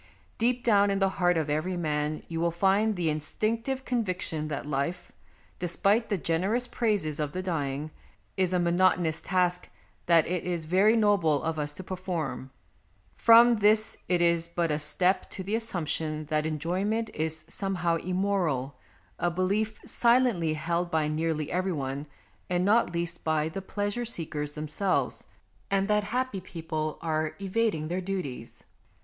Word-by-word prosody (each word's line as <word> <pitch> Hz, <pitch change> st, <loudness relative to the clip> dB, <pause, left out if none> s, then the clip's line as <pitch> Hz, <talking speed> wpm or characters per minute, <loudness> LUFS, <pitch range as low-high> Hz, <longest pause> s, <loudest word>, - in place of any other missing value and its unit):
Deep 245 Hz, +1 st, +1 dB
down 205 Hz, -3 st, +4 dB
in 195 Hz, -, +1 dB
the 195 Hz, 0 st, +2 dB
heart 175 Hz, -1 st, +3 dB
of 160 Hz, -2 st, 0 dB
every 155 Hz, +5 st, -1 dB
man 150 Hz, -2 st, -1 dB
you 165 Hz, -1 st, -4 dB
will 170 Hz, -, +3 dB
find 195 Hz, +5 st, +2 dB
the 175 Hz, -3 st, -1 dB
instinctive 225 Hz, -, -2 dB
conviction 185 Hz, -9 st, -2 dB
that 145 Hz, -2 st, -4 dB
life, 150 Hz, +5 st, -3 dB, 0.5 s
despite 200 Hz, +6 st, +1 dB
the 200 Hz, -, +1 dB
generous 190 Hz, +9 st, 0 dB
praises 205 Hz, -, -1 dB
of 150 Hz, -1 st, -2 dB
the 185 Hz, +1 st, -3 dB
dying, 150 Hz, -4 st, -2 dB, 0.4 s
is 185 Hz, -2 st, +1 dB
a 185 Hz, -, +2 dB
monotonous 175 Hz, -2 st, +2 dB
task 180 Hz, -1 st, 0 dB, 0.4 s
that 170 Hz, -2 st, +5 dB
it 180 Hz, -1 st, -2 dB
is 175 Hz, -3 st, -2 dB
very 195 Hz, +7 st, +4 dB
noble 195 Hz, -9 st, +3 dB
of 160 Hz, -1 st, -2 dB
us 145 Hz, 0 st, -2 dB
to 185 Hz, -, -8 dB
perform. 180 Hz, -7 st, -4 dB, 0.7 s
From 235 Hz, +1 st, +7 dB
this 215 Hz, +1 st, +3 dB
it 175 Hz, -1 st, +3 dB
is 170 Hz, -1 st, +2 dB
but 170 Hz, -1 st, -1 dB
a 150 Hz, -, 0 dB
step 180 Hz, +5 st, +1 dB
to 190 Hz, -, -6 dB
the 200 Hz, +3 st, -4 dB
assumption 160 Hz, -8 st, -1 dB
that 155 Hz, 0 st, +1 dB
enjoyment 185 Hz, +9 st, -1 dB
is 160 Hz, 0 st, -3 dB
some 195 Hz, -1 st, -3 dB
how 170 Hz, -1 st, +1 dB
immoral, 175 Hz, -8 st, -1 dB, 0.4 s
a 175 Hz, -, +2 dB
belief 200 Hz, +5 st, -1 dB
silently 235 Hz, -10 st, +2 dB
held 170 Hz, +3 st, -1 dB
by 160 Hz, -2 st, +1 dB
nearly 155 Hz, 0 st, -1 dB
every 185 Hz, +1 st, 0 dB
one, 140 Hz, 0 st, -4 dB, 0.4 s
and 180 Hz, 0 st, +1 dB
not 215 Hz, 0 st, +3 dB
least 170 Hz, 0 st, -3 dB
by 155 Hz, -1 st, +1 dB
the 195 Hz, +5 st, -5 dB
pleasure 205 Hz, +4 st, -2 dB
seekers 150 Hz, -8 st, -3 dB
themselves, 155 Hz, +6 st, -1 dB, 0.4 s
and 195 Hz, 0 st, +1 dB
that 210 Hz, -1 st, +2 dB
happy 245 Hz, -2 st, -2 dB
people 160 Hz, -3 st, -4 dB
are 155 Hz, -1 st, -1 dB
evading 200 Hz, -5 st, 0 dB
their 180 Hz, +3 st, -2 dB
duties. 175 Hz, -12 st, -5 dB
175 Hz, 155 wpm, -28 LUFS, 155-200 Hz, 0.7 s, From